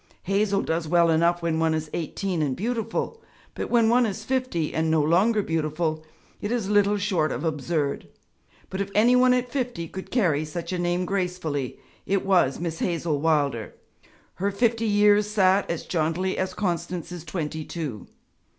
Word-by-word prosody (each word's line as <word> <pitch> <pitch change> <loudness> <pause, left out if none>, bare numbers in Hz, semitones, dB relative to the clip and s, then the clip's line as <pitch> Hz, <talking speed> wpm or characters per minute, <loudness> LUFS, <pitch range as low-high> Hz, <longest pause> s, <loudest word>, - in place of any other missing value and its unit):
'Hazel' 200 +1 +1
does 160 0 -1
well 170 0 +4
enough 170 +2 +2
when 165 -1 0
one 160 -1 +2
is 155 0 -3
eighteen 175 +2 -2
and 140 -4 0
beautiful, 230 - -3 0.3
but - - -4
when 235 -2 +4
one 240 +1 +4
is 210 +1 -5
fifty 255 - -1
and 160 0 0
no 160 0 +3
longer 190 +8 +3
beautiful, 155 -1 -1 0.4
it 205 - -3
is 225 -5 -1
little 205 0 +4
short 185 -6 0
of - - -4
absurd. 150 -2 -1 0.6
But 190 - -2
if 200 - -3
any 235 +4 +5
one 250 0 +5
at 250 0 -2
fifty 245 -11 -2
could 190 +3 -8
carry 170 - +2
such 165 +4 -5
a 180 - -2
name 175 +1 0
gracefully, 180 -8 -2 0.3
it 195 0 0
was 175 -9 +3
Miss 165 -1 -3
Hazel 165 -4 -1
Wilder; 145 -8 0 0.6
her 195 +3 0
fifty 230 +2 +1
years 205 0 +4
sat 195 -2 +3
as 170 - -3
jauntily 170 +3 0
as 185 -1 -2
Constance's 175 -2 -3
twenty 155 -1 -4
two. 150 -10 -6
175 Hz, 170 wpm, -25 LUFS, 160-205 Hz, 0.6 s, any